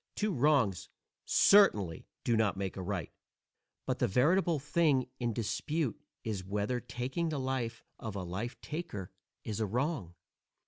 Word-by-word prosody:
_ - - -53
Two 210 -2 0
wrongs 130 - +2 0.4
certainly 105 - +5 0.2
do 120 - +2
not 110 -3 +2
make 95 -1 -3
a 95 - -4
right, 90 -3 -3 0.7
but - - -1
the - - +3
veritable 165 - +3
thing 145 -2 +2
in 120 -2 0
dispute 135 +5 -1 0.2
is 105 -4 -3
whether 105 +5 -1
taking 130 +8 -3
the 150 -3 -2
life 130 -4 -2 0.2
of 110 -3 -5
a 95 - -3
life 95 +8 -4
taker 150 - -5 0.3
is 110 -1 -3
a 110 - +1
wrong. 120 - -1
120 Hz, 150 wpm, -32 LUFS, 100-150 Hz, 0.7 s, certainly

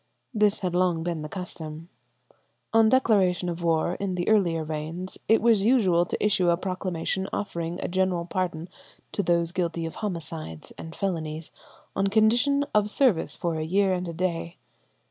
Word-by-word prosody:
This 210 -2 +2
had 180 -2 -1
long 175 -2 +1
been 170 -2 -2
the 150 - -6
custom. 165 -3 -7 0.9
On 225 -1 +6
declaration 195 -8 +3
of 170 0 -4
war 165 +1 +1
in 195 -2 -2
the 175 -1 -2
earlier 175 -7 +3
reigns, 160 +4 -5
it 225 0 +4
was 230 -4 +5
usual 195 -7 +3
to - - -2
issue 190 -4 +3
a 170 - +3
proclamation 185 0 -2
offering 170 -3 -3
a - - -1
general 185 -1 0
pardon 175 -2 -2 0.4
to - - 0
those 170 -2 +1
guilty 170 -2 -2
of 165 - -6
homicides 165 - -5
and 160 0 -9
felonies 160 -4 -3 0.4
on 195 - +1
condition 240 +7 +3
of 210 0 +3
service 225 -7 +2
for 170 -1 -2
a 155 - -2
year 190 +4 +2
and 180 0 -2
a 170 - -4
day. 170 0 -2
180 Hz, 165 wpm, -26 LUFS, 165-200 Hz, 0.9 s, On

